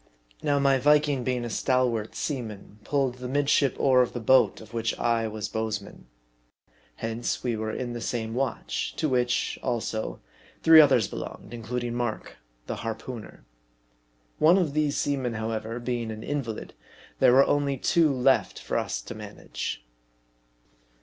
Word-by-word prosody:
Now, 145 -1 +1
my 140 -1 +3
Viking 145 -1 +3
being 125 -1 -1
a - - -4
stalwart 125 -3 0
seaman, 110 -7 -5
pulled 135 -3 0
the 125 - -5
midship 140 0 +2
oar 130 -2 +5
of 125 - 0
the 120 - -3
boat 130 +3 +4
of 110 +1 -14
which 115 -1 -1
I 115 -1 +1
was 110 -1 -4
bowsman. 110 - -4 0.9
Hence, 115 - -3
we 120 -2 0
were 110 0 -3
in 120 +1 -4
the 120 - -5
same 115 -2 -3
watch; 130 +2 -2
to 155 - 0
which, 125 -3 0
also, 115 -3 -2 0.4
three 160 -1 +10
others 120 -9 +4
belonged, - - -8
including 120 +1 -3
Mark, 120 -2 -3 0.3
the - - -4
harpooneer. 115 0 -7 0.9
One 165 +4 +6
of 170 -7 +1
these 150 -1 +1
seamen, 130 -5 -1
however, 110 +1 -3
being 120 -2 -3
an 110 0 -6
invalid, 135 -7 -4 0.5
there 125 - +6
were 135 +2 +7
only 140 -1 +1
two 165 +3 +3
left 130 0 +2
for - - -2
us - - -3
to - - -7
manage. - - -6
125 Hz, 150 wpm, -27 LUFS, 115-135 Hz, 0.9 s, three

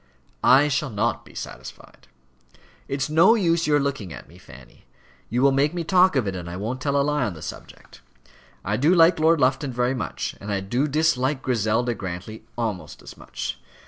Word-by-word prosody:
"I 140 +3 +6
shall 145 0 -1
not 105 -3 -1
be - - -17
satisfied. 65 - -10 0.8
It's 135 0 -2
no 165 +9 +5
use 170 -6 +1
your 150 -1 +3
looking 140 -10 -3
at 65 -1 -10
me, 85 +5 -17
Fanny. - - -16 0.4
You 125 +3 0
will 140 - +5
make 145 +5 +1
me 170 - -2
talk 185 0 +4
of 130 -5 +1
it, 95 - -3
and 85 -1 -6
I 90 - -6
won't 115 +6 -4
tell 140 0 +1
a - - +3
lie 150 -1 0
on 105 -7 -3
the 80 - -10
subject. - - -11 0.6
I 105 +2 0
do 155 +9 +3
like 165 0 +5
Lord 160 +1 +4
Lufton 135 +1 +1
very 125 +1 0
much; 130 - -4
and 105 +1 -5
I 100 - 0
do 120 +9 -1
dislike 140 -3 +1
Griselda 120 0 0
Grantly 95 +2 -7
almost 110 -6 -4
as - - -11
much. - - -6
130 Hz, 195 wpm, -23 LUFS, 105-150 Hz, 0.8 s, I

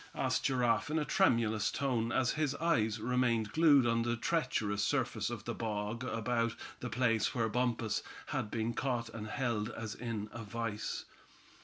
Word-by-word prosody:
asked - - 0
Giraffe 125 0 +2
in 155 - 0
a 150 - +1
tremulous 115 -4 +3
tone, 120 -5 0
as 130 0 +2
his 150 -2 0
eyes 120 -9 +1
remained 115 -2 +1
glued 150 -5 +6
on 115 0 +2
the 120 0 0
treacherous 105 -8 0
surface - - 0
of - - -6
the - - -2
bog 110 +1 -3
about 115 -1 0 0.2
the 125 - -4
place 115 -3 +1
where 115 -2 +2
Bumpus 115 -1 0 0.3
had 105 - -2
been 115 +1 -1
caught 120 -4 -1
and 110 -1 -6
held 115 -3 -1
as 115 -2 -5
in 115 -3 -4
a 115 - -7
vise. 115 0 -3
115 Hz, 165 wpm, -33 LUFS, 110-125 Hz, 0.3 s, glued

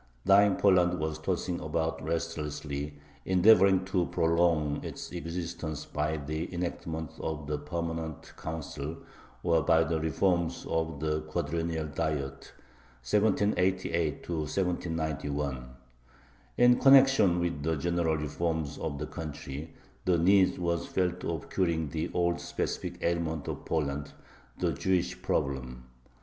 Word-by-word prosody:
Dying 100 0 +6
Poland 90 -3 +4
was 80 -1 -2
tossing 90 +1 -2
about 80 0 -2
restlessly, 75 -3 -3 0.3
endeavoring 95 0 +5
to 95 -2 0
prolong 80 -3 +2
its - - -7
existence 85 -3 -4
by 75 +1 -1
the 75 +2 -4
enactments 85 -3 -4
of 80 -2 -4
the 75 0 -2
Permanent 80 0 -4
Council 80 -1 -5 0.5
or 85 -2 +3
by 80 +2 +4
the 80 0 -1
reforms 85 +2 0
of 80 0 -1
the 75 0 0
Quadrennial 80 +1 -2
Diet 70 -2 -3 0.6
(1788 95 - +1
1791). 75 -5 -2 0.9
In 125 0 +6
connection 135 -10 +6
with 85 -4 -1
the 80 +2 0
general 85 +1 0
reforms 75 0 -2
of 75 -3 -3
the 75 - -3
country 75 -2 -6 0.3
the 90 -2 +3
need 95 +3 +4
was 85 -1 -1
felt 90 -1 -1
of 80 -3 -4
curing 85 -5 0
the 80 +2 -2
old 85 0 +1
specific - - -3
ailment 85 -3 -1
of - - -5
Poland, 75 -3 -2 0.4
the - - +1
Jewish 90 -1 0
Problem. 65 -3 -2
80 Hz, 120 wpm, -30 LUFS, 75-90 Hz, 0.9 s, Dying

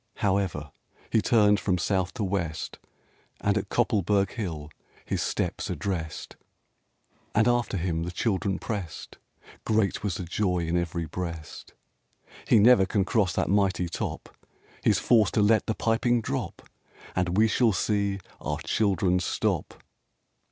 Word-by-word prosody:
However, 95 -7 -1 0.4
he 110 - +3
turned 105 -4 +4
from 90 -2 0
south 95 0 -1
to 115 - -2
west, 85 -5 -3 0.6
And 100 - +1
to 105 - +1
Koppelberg 100 -2 +1
Hill 80 -9 -5 0.3
his - - -2
steps - - -2
addressed, 80 -6 -4
RAINBOW - - -43 0.2
GOLD - - -1
And 110 +2 +5
after 120 -4 +1
him 85 -2 -1
the 85 - -3
children 95 0 -1
pressed; 95 -8 -6 0.4
Great 110 -3 +1
was 100 -4 -2
the 90 - -4
joy 90 -1 0
in 85 +1 -1
every 85 -1 -1
breast. 85 -1 -7 0.7
"He - - +5
never 110 -2 +6
can 100 -1 +1
cross 100 -7 +1
that - - 0
mighty 95 -3 +2
top! 85 - -5 0.5
He's - - +4
forced 110 -5 +3
to 105 - +4
let 110 +1 +3
the 110 - 0
piping 120 +2 +1
drop, - - -4 0.5
And 90 0 0
we 110 +1 +5
shall 115 +1 +3
see 100 0 0 0.2
our - - -3
children 95 -3 +1
stop!" 90 - -2
100 Hz, 145 wpm, -27 LUFS, 90-105 Hz, 0.7 s, never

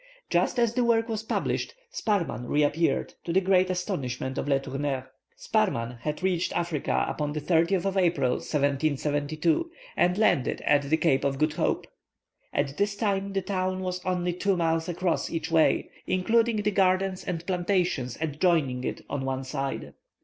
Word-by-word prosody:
Just - - +2
as 235 -2 +2
the 245 - +2
work 230 -1 +3
was 220 -2 -2
published, 220 - -2 0.2
Sparrman 185 - -1
reappeared, 150 +3 +1
to 170 - -3
the 185 - +4
great 185 -1 +3
astonishment 135 - -2
of - - -3
Le 140 -1 +3
Tourneur. 135 -1 -3 0.3
Sparrman 125 - 0
had 150 +7 -4
reached 185 -2 0
Africa 170 -4 0
upon 150 -1 -2
the 150 - -2
30th 170 +4 +2
of 195 0 0
April, 165 -9 +2
1772, 150 - 0 0.3
and 180 +1 +2
landed 210 - +2
at 145 -1 +3
the 160 - +4
Cape 140 -5 +2
of 140 -1 0
Good 155 +1 +1
Hope. - - 0 0.7
At 140 +1 -1
this 205 0 +1
time 200 -2 -1
the 195 -1 0
town 185 -1 -1
was 180 -1 -3
only 180 -1 0
two 190 +1 0
miles 165 0 0
across 175 0 0
each 165 0 -3
way, 160 -1 +3 0.2
including 225 +3 +2
the 210 - +2
gardens 190 -1 +2
and 170 -2 -4
plantations 175 - 0
adjoining 150 -4 +1
it - - -3
on 140 -2 -3
one 135 0 -2
side. 135 +1 -4
170 Hz, 165 wpm, -27 LUFS, 145-190 Hz, 0.7 s, the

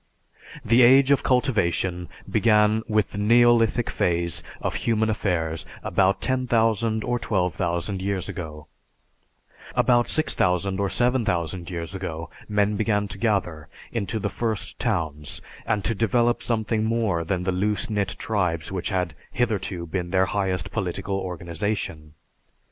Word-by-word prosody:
The 115 +3 +5
age 135 +3 +7
of 140 - +4
cultivation 95 -9 +1 0.2
began 105 -1 +3
with 110 -1 +1
the 100 - -5
neolithic 120 +1 +4
phase 85 -1 0 0.2
of - - -2
human 110 -1 +1
affairs 80 -6 -1 0.2
about 95 0 +2
10,000 115 -3 +1
or 120 0 -1
12,000 90 -2 -1
years 95 -1 -2
ago; 75 -5 -7 1.1
about 120 -1 +3
6000 95 - +1
or 100 -1 +1
7000 95 -9 0
years 85 -1 -5
ago 85 -4 -5 0.2
men 105 0 +2
began 105 -1 +1
to - - -7
gather 90 -9 0 0.2
into 115 -1 -2
the 105 - -1
first 110 -7 -3
towns 80 -10 -2 0.3
and 105 -2 0
to 115 - +1
develop 120 +2 +2
something 110 -1 0
more 110 -7 0
than 90 +2 -1
the 95 - 0
loose 105 +3 0
knit 105 -3 -1
tribes 90 -7 -1
which 95 -2 -2
had 90 -3 -1 0.2
hitherto 100 -7 -1
been 90 +1 -3
their 95 +1 +3
highest 95 -3 -1
political 95 +2 -2
organization. 85 -3 -4
100 Hz, 130 wpm, -24 LUFS, 90-115 Hz, 1.1 s, age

